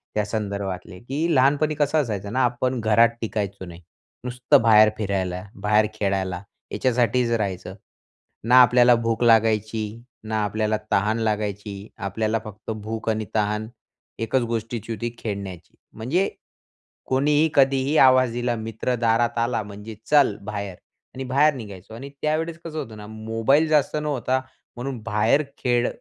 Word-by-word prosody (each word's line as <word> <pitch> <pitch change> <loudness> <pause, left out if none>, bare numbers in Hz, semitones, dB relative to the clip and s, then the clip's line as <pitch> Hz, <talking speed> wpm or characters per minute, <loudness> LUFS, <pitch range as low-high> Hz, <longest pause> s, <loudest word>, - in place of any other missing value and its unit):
त्यासंदर्भातले, 100 -4 -3
की 150 +7 -1
लहानपणी 145 +4 +3
कसं 145 +1 +1
असायचं 105 -5 -4
ना, 130 +1 +2
आपण 125 +1 -1
घरात 115 +1 +4
टिकायचो 100 -3 -3
नाही. 85 0 -11 0.4
नुसतं 125 -1 +2
बाहेर 110 -2 +6
फिरायला, 95 -3 -2 0.2
बाहेर 105 +1 +3
खेळायला, 95 -4 -2 0.3
याच्यासाठीच 125 -1 +1
राहायचं. 95 -4 -2 0.7
ना 125 +3 +7
आपल्याला 125 0 +6
भूक 115 0 -1
लागायची, 110 -1 +2 0.2
ना 110 -1 -1
आपल्याला 110 +1 0
तहान 105 +3 +2
लागायची. 105 -2 -3
आपल्याला 110 +3 -1
फक्त 105 +1 -8
भूक 110 +1 -4
आणि 110 0 -1
तहान 105 +1 0 0.5
एकच 115 +3 +1
गोष्टीची 115 0 -4
होती, 120 +2 -3
खेळण्याची. 100 -5 -6 0.2
म्हणजे 150 - 0 0.8
कोणीही, 145 +4 +3
कधीही 135 +1 +3
आवाज 130 -3 +6
दिला, 120 0 -1
मित्र 115 +2 -3
दारात 115 0 +1
आला 115 -1 0
म्हणजे 105 +2 -9
"चल 145 -8 +4
बाहेर" 100 -2 -5 0.4
आणि 135 - -4
बाहेर 140 +4 +3
निघायचो 105 -5 -10
आणि 130 +5 -8
त्यावेळेस 160 +2 -1
कसं 160 -2 -7
होतं 110 -6 -7
ना, 105 0 -9
मोबाईल 115 +7 +1
जास्त 150 -2 +2
नव्हता 130 -3 0 0.4
म्हणून 125 0 -5
बाहेर 115 +6 +2
खेळ 120 -1 +1
115 Hz, 135 wpm, -23 LUFS, 105-125 Hz, 0.8 s, ना